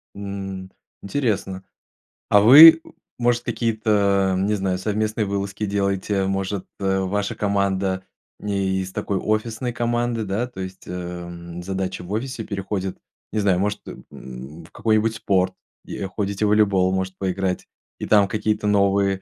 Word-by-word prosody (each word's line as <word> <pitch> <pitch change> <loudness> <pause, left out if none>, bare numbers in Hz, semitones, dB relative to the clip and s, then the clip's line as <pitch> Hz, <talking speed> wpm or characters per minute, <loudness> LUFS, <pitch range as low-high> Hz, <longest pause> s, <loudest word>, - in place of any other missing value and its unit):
М. 95 -2 -6 0.3
Интересно. 100 -5 -2 0.7
А 105 - +6
вы, 160 +9 +10 0.4
может, 120 0 +1
какие-то, 105 -4 +1
не 100 +3 +1
знаю, 95 -2 -1
совместные 110 +2 -1
вылазки 100 +1 -3
делаете? 100 0 0
Может, 95 0 -2
э, 95 -1 +1
ваша 100 +2 -2
команда 100 -2 0 0.4
не 100 -2 -1
из 95 0 -6
такой 100 +1 -2
офисной 110 +4 -1
команды, 120 -1 -1
да? 105 +5 -1
То 120 -6 -12
есть, 95 0 -8
эм, 85 -1 -7
задача 95 0 -3
в 90 - -9
офисе 115 +2 -3
переходит, 95 -2 -4 0.3
не 110 - -1
знаю, 100 -3 +2
может, 105 +1 -1
э, - - -5 0.2
м, 65 +6 -10
в 90 - -19
какой-нибудь 110 0 +1
спорт 95 -4 +1 0.3
и, - - -7
э, 95 - -3
ходите 100 +1 -2
в - - +2
волейбол 100 -3 +3
может 95 0 -2
поиграть, 95 -1 -2 0.3
и - - -4
там 105 -2 +5
какие-то 105 +1 -1
новые 100 -1 +2
100 Hz, 145 wpm, -22 LUFS, 95-105 Hz, 0.7 s, вы